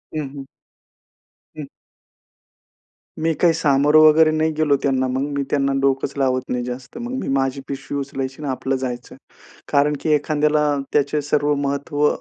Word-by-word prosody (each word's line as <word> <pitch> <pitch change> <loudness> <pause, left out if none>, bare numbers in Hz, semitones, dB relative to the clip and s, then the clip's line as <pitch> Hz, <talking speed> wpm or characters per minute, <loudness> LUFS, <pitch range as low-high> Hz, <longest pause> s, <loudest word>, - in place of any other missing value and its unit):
हं, - - -1 0.2
हं. 140 - -7 1.1
हं. 150 - -5 1.5
मी 160 +1 +1
काही 170 -2 +5
सामोरे 150 -1 +3
वगैरे 155 0 +6
नाही 155 0 +1
गेलो 155 -2 +3
त्यांना. 130 -1 +1
मग 130 +1 -2 0.2
मी 140 - 0
त्यांना 140 -1 +1
डोकंच 135 0 0
लावत 130 -2 +1
नाही 125 -1 -1
जास्त. 125 - -7
मग 240 +1 -5
मी - - -5
माझी 135 0 -1
पिशवी 140 +1 -5
उचलायची 135 0 -5
आणि 145 - -4
आपलं 135 +1 -2
जायचं. 125 -1 -5 0.6
कारण 145 +1 +3
की - - -2
एखाद्याला 150 0 +1 0.3
त्याचे 150 +1 +1
सर्व 145 0 +1
महत्त्व 145 +1 0
140 Hz, 150 wpm, -21 LUFS, 135-150 Hz, 1.5 s, वगैरे